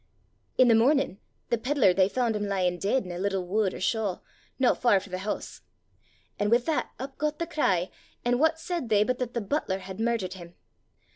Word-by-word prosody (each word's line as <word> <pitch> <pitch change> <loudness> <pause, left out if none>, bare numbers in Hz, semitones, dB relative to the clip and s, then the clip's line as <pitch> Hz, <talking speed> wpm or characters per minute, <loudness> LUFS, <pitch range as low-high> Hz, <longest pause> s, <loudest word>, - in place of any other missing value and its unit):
"'I' - - +7
the 240 -2 +5
mornin' 240 -2 +3 0.3
the 235 - +1
pedlar 250 -6 +3
they 190 +1 +3
faund 235 -1 0
him 210 -1 -2
lyin' 180 -3 0
deid 210 +5 +1
in 180 - -6
a 175 - -5
little 195 -1 -1
wud 200 +1 +1
or - - -7
shaw, 205 -2 0 0.4
no 260 -2 +4
far 235 -5 +3
frae 190 - -13
the 185 - -3
hoose. 205 +2 -5 0.8
An' 205 - +1
wi' 235 - +6
that 290 +6 -1
up 270 +1 -8
got 300 0 -1
the 335 - -2
cry, 190 - 0 0.3
an' 245 0 +2
what 320 +2 +3
said 340 -7 -3
they 210 -1 +4
but 250 +3 -1
that 250 -1 -3
the 235 - 0
butler 205 -3 -1
had 190 +1 -9
murdert 225 -5 0
him! 175 -2 -11
220 Hz, 210 wpm, -27 LUFS, 190-255 Hz, 0.8 s, I